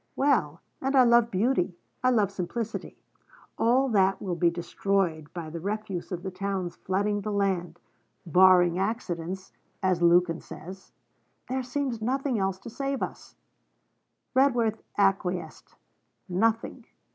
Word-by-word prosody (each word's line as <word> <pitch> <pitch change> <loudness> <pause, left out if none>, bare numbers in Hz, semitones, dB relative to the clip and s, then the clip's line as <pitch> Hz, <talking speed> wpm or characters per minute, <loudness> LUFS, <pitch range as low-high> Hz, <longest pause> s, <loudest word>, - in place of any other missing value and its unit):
Well, 215 - +1 0.2
and 270 +1 0
I 260 - +8
love 235 -1 +5
beauty, 195 -4 0 0.3
I 255 - +5
love 210 -6 +2
simplicity. 210 +5 -4 0.6
All 255 +4 +3
that 195 -3 +3
will 185 -3 -3
be 170 0 +3
destroyed 170 -2 -1
by 165 -3 -6
the 170 - -5
refuse 200 0 -4
of 180 -1 -4
the 190 - -4
towns 185 -2 -3
flooding 205 +2 -1
the 210 +1 -3
land 185 -4 -1 0.5
barring 180 0 +5
accidents, 190 -3 -3 0.3
as 185 -2 +2
Lukin 170 -1 +4
says. 190 +3 -10 0.6
There 260 +1 -1
seems 255 -2 -3
nothing 260 0 0
else 190 -1 0
to 235 - -8
save 275 +2 -2
us.' - - -7 1.0
Redworth 245 -5 +2 0.2
acquiesced. 195 -2 0 0.5
'Nothing.' 225 +5 0
195 Hz, 130 wpm, -27 LUFS, 180-235 Hz, 1.0 s, I